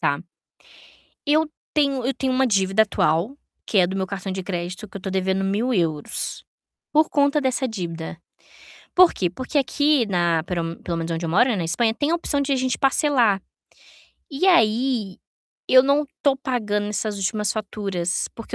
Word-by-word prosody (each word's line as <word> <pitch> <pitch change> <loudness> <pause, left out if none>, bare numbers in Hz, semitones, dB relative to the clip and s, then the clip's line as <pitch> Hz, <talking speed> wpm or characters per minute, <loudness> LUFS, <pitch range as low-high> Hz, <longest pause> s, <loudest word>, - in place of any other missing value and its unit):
tá. 145 0 0 1.1
Eu 310 +1 +3 0.2
tenho 280 -4 +1
eu 270 - +1
tenho 265 -1 -2
uma 260 +1 +2
dívida 195 -1 +3
atual, 190 - 0 0.3
que 205 - 0
é 180 - +5
do 190 +2 -4
meu 190 -1 -1
cartão 195 0 -5
de 190 0 -4
crédito 180 +2 -5
que 200 - -10
eu - - -4
estou 190 +1 -5
devendo 190 0 0
1000 215 +6 0
euros, 160 -7 -1 0.5
por 310 +1 +4
conta 285 +1 +2
dessa 260 0 0
dívida. 170 -5 -6 0.8
Por 365 -1 +7
quê? 180 - -1
Porque 255 - -2
aqui 285 -2 +2
na, 175 -4 +1
pero 170 -1 -3
pelo 170 -1 -3
menos 165 0 -3
onde 165 +1 -3
eu - - -3
moro, 240 +9 +4
né, 220 - 0
na 175 - -2
Espanha 220 +7 +1
tem 290 +4 -1
a - - +3
opção 310 -4 0
de 280 0 0
a - - +2
gente 255 -1 -1
parcelar. 265 -8 +3 0.9
E 290 +7 0
aí, 230 - +2 0.5
eu 255 0 +7
não 280 +2 +2 0.2
tô 280 -2 +3
pagando 215 -6 -2
essas 210 0 -2
últimas 205 +1 -1
faturas, 195 -4 -3
porque 230 - -8
215 Hz, 180 wpm, -23 LUFS, 185-265 Hz, 1.1 s, Por